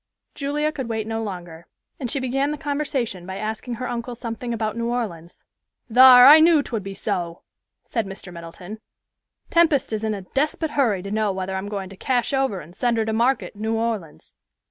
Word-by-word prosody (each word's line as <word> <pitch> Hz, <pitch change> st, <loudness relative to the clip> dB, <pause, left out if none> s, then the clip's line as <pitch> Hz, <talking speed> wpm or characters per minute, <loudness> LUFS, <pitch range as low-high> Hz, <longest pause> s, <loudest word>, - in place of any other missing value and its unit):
Julia 295 Hz, +2 st, -1 dB
could 265 Hz, -6 st, -5 dB
wait 220 Hz, -1 st, -2 dB
no 225 Hz, 0 st, -3 dB
longer, 175 Hz, -5 st, -7 dB, 0.3 s
and 250 Hz, -, -3 dB
she 275 Hz, -, -1 dB
began 270 Hz, +2 st, 0 dB
the 300 Hz, -, -3 dB
conversation 275 Hz, -10 st, -2 dB
by 190 Hz, 0 st, -5 dB
asking 220 Hz, +3 st, -4 dB
her 250 Hz, +2 st, -4 dB
uncle 240 Hz, 0 st, -4 dB
something 235 Hz, +1 st, -5 dB
about 220 Hz, -2 st, -2 dB
New 235 Hz, 0 st, -2 dB
Orleans. 185 Hz, -9 st, -5 dB, 0.5 s
"Thar, 250 Hz, 0 st, +9 dB
I 295 Hz, +4 st, +10 dB
knew 315 Hz, -2 st, +5 dB
'twould 225 Hz, -5 st, -3 dB
be 195 Hz, 0 st, -7 dB
so," 180 Hz, -4 st, -3 dB, 0.4 s
said 230 Hz, -7 st, -2 dB
Mr. 195 Hz, -2 st, -9 dB
Middleton; 175 Hz, +5 st, -9 dB, 0.7 s
"Tempest 330 Hz, -8 st, +3 dB
is 215 Hz, 0 st, -2 dB
in 215 Hz, -1 st, 0 dB
a 195 Hz, -, -7 dB
desput 300 Hz, -, -1 dB
hurry 225 Hz, -10 st, +1 dB
to 200 Hz, -, -6 dB
know 215 Hz, -1 st, +1 dB
whether 190 Hz, 0 st, -4 dB
I'm 190 Hz, +2 st, -4 dB
going 195 Hz, -3 st, -4 dB
to 195 Hz, -, -11 dB
cash 245 Hz, +5 st, -1 dB
over 265 Hz, -8 st, 0 dB
and 170 Hz, +4 st, -14 dB
send 235 Hz, +1 st, 0 dB
her 220 Hz, -, +1 dB
to 220 Hz, -, -2 dB
market 240 Hz, +4 st, +1 dB
in 205 Hz, -, -12 dB
New 220 Hz, +1 st, 0 dB
Orleans." 225 Hz, -8 st, -4 dB
225 Hz, 200 wpm, -23 LUFS, 195-260 Hz, 0.7 s, I